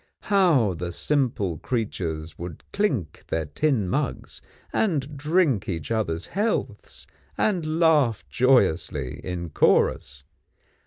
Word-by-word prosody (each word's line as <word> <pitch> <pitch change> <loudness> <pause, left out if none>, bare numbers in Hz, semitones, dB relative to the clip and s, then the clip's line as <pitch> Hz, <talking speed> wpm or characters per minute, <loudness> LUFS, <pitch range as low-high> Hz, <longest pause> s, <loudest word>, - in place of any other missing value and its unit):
How 155 - +4
the 85 +1 -4
simple 110 - 0
creatures 85 -9 -3
would 85 -2 -7
clink 140 - -1
their 80 -1 -1
tin 110 - 0
mugs, 140 +8 -3 0.3
and 150 -8 0
drink 150 - +1
each 80 +1 -4
other's 90 -7 -1
healths, 210 +4 -2 0.3
and 165 -6 0
laugh 140 - +3
joyously 80 - +2
in 85 -3 -5
chorus! 70 -1 +2
115 Hz, 105 wpm, -25 LUFS, -, 0.3 s, How